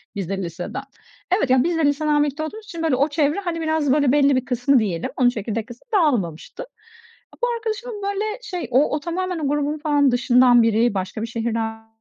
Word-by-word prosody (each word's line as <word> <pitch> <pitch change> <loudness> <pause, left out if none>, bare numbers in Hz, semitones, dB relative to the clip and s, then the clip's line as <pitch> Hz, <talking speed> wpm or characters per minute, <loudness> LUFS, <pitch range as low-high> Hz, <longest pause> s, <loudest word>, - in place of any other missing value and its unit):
biz 195 -4 -4
de 195 - -2
liseden, 175 +10 -5 0.5
evet 275 - 0
ya 255 -1 +4
biz 340 +1 0
de 320 - +2
liseden 295 +1 +2
birlikte 295 +1 -3
olduğumuz 425 +8 -7
için 335 -4 -6
böyle 315 -5 +2
o 280 +4 +1
çevre, 295 +4 +1
hani, 345 -4 -3
biraz 315 -4 +1
böyle 285 -3 +3
belli 280 -1 +4
bir 255 - -1
kısmı 255 +1 +2
diyelim, 195 -1 -2
onun 250 -2 +4
çekirdek 220 -1 -4
kısmı 240 - -13
dağılmamıştı. 250 - 0 0.8
Bu - - +4
arkadaşımın 450 -1 -5
böyle 400 +1 -1 0.2
şey 360 - -5
o 275 +4 +3
o 300 - -2
tamamen 360 +2 -3
o 300 - -1
grubun 295 +1 -1
falan 290 -3 +2
dışından 245 -1 +5
biri, 225 +1 +2
başka 190 +2 -4
bir 230 - -3
şehirden 225 -1 -3
280 Hz, 200 wpm, -22 LUFS, 235-320 Hz, 0.8 s, dışından